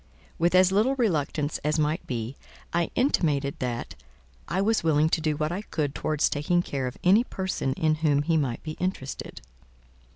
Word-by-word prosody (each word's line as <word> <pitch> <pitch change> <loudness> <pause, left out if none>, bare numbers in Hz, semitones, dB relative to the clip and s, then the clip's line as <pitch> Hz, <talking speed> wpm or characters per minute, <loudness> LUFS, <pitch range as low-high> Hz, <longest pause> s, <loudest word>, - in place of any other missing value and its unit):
With 170 +2 +3
as 185 0 +6
little 220 +8 +3
reluctance 155 - 0
as 150 +1 0
might 155 +2 0
be, 120 +1 -3 0.4
I 170 0 +1
intimated 150 - +1
that 120 -2 -3 0.5
"I 175 +5 -1
was 215 +1 +2
willing 155 -1 +3
to 160 - +1
do 155 -1 0
what 155 +1 -1
I 185 +3 -3
could 150 -8 -2
towards 155 -1 +1
taking 175 +5 +1
care 135 -5 -3
of 125 - -6
any 200 +6 +5
person 190 - -2
in 155 +2 +1
whom 145 -2 +3
he 165 +2 +1
might 135 -7 -1
be 155 - -4
interested.". 180 -7 -4
155 Hz, 175 wpm, -26 LUFS, 145-185 Hz, 0.5 s, as